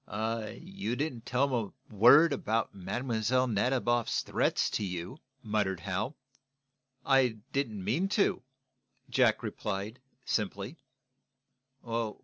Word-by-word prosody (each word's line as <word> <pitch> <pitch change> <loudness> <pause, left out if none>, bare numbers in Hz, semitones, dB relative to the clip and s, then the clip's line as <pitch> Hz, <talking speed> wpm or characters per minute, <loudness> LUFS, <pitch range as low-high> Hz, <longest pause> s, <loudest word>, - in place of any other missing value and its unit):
"You 115 - -3
didn't 130 -5 -3
tell 125 +3 +2
them 115 -7 -2 0.2
a - - -13
word 140 +9 +7
about 115 -4 -1
Mlle. 115 +5 0
Nadiboff's 120 +1 +1
threats - - +1
to - - -1
you," 90 - -5 0.2
muttered 105 -5 0
Hal. 100 - -2 0.9
"I 130 -4 +3 0.2
didn't 110 -8 -1
mean 150 - 0
to," 205 - +2 0.7
Jack 125 -4 +3
replied, 105 +1 -4 0.3
simply. 105 - -2
115 Hz, 105 wpm, -30 LUFS, 105-130 Hz, 0.9 s, word